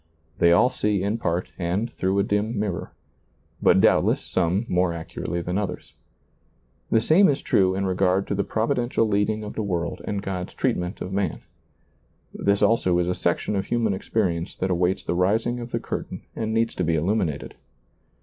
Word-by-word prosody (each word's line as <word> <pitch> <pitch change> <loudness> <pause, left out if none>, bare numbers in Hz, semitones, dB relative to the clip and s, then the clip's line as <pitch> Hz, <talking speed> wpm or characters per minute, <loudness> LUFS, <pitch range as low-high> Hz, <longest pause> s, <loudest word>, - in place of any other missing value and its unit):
They 85 - +5
all 125 +9 +5
see 105 -5 0
in 105 +3 -1
part 85 -4 -1
and 95 +7 -1
through 95 +1 0
a 100 - +3
dim 105 +3 -1
mirror, 100 -5 -3 0.7
but - - +5
doubtless - - +4
some 95 +5 0
more 90 -1 +1
accurately 85 +1 -4
than 90 +3 -1
others. 100 -3 -5 1.0
The 115 - +4
same 160 - +5
is 140 - +1
true 95 -1 +2
in 100 0 -1
regard 95 +1 +1
to - - -3
the 100 0 0
Providential 120 +1 0
leading 105 +1 0
of 105 - -6
the - - -3
world 85 -4 -2
and 100 -1 -3
God's 90 -2 -4
treatment 90 +3 -1
of 95 - -5
man. 95 -4 -1 0.9
This 100 0 +1
also 95 -6 +3
is 90 0 +1
a 90 - +1
section 85 +4 -1
of 95 -1 -1
human 115 -4 +1
experience 95 -4 -1
that 95 0 -1
awaits 90 +1 +1
the - - -1
rising 110 +7 +1
of 120 0 -6
the - - -2
curtain - - -5
and 110 -1 -2
needs 115 +1 +1
to 90 - -2
be 85 -1 +1
illuminated. 80 -3 -1
95 Hz, 180 wpm, -24 LUFS, 90-110 Hz, 1.0 s, They